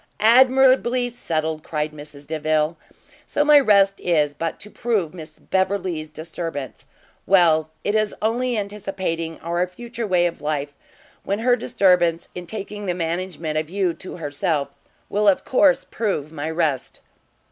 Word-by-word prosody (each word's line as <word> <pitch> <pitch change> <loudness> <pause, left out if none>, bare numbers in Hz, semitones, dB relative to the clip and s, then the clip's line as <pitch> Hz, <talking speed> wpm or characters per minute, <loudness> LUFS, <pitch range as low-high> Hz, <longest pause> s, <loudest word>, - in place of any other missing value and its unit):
"Admirably 255 +1 +5
settled!" 160 -9 -3
cried 150 -1 -3
Mrs 145 -1 -11
Delvile: 155 +1 0 0.5
"so 295 - +1
my 300 -1 +8
rest 200 -6 +4
is 150 -4 +2
but 165 +2 -4
to 210 - -11
prove 210 -9 -1
Miss 155 -3 -10
Beverley's 185 -5 -1
disturbance! 155 -3 -6 0.4
Well, 165 -5 +4
it 205 - 0
is 215 -1 +1
only 240 +2 0
anticipating 190 -5 -3
our 175 +2 -1
future 230 +4 -6
way 180 -2 +3
of 170 -1 -3
life, 145 -1 -2 0.5
when 200 - -1
her 245 +3 +3
disturbance, 180 -7 +2
in 180 -1 -8
taking 205 0 -6
the 180 - 0
management 165 -2 -2
of 155 0 -5
you 185 -2 0
to 185 - -9
herself, 145 -1 -1 0.4
will 210 +1 0
of 195 - +3
course 270 +1 +4
prove 175 -10 -3
my 155 0 -4
rest." 160 -5 -1
175 Hz, 145 wpm, -22 LUFS, 155-210 Hz, 0.5 s, my